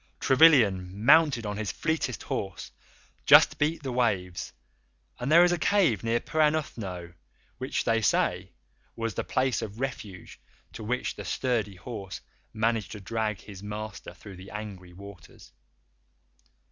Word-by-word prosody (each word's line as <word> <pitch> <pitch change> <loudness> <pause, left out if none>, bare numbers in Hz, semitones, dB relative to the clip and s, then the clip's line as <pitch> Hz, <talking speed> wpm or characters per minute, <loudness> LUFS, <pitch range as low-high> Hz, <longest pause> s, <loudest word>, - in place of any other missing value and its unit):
Trevilian, 110 - +4
mounted 145 -5 +5
on 105 0 -4
his 105 -2 -3
fleetest 160 -6 -2
horse, 95 -3 -5 0.6
just - - +7
beat 150 +1 0
the 135 - -3
waves, 95 -8 -1 0.7
and 125 +4 -2
there 170 +2 +8
is 175 - +4
a 175 - 0
cave 165 - +2
near 115 +1 +1
Perranuthnoe 120 - -1 0.5
which, 130 +1 -2
they 115 -1 +1
say, 105 - 0 0.4
was 115 -2 -3
the - - -3
place 130 -1 0
of 105 +1 -7
refuge 110 -8 -6 0.3
to 110 - -8
which 125 +4 -2
the - - -7
sturdy 115 -6 -1
horse 100 0 -7 0.3
managed 110 -1 -1
to 105 - -8
drag 105 -1 -3
his 100 -2 -11
master 105 0 -7
through 100 -3 -12
the 95 +1 -11
angry 100 -4 -8
waters. 95 -2 -14
110 Hz, 140 wpm, -27 LUFS, 100-130 Hz, 0.7 s, there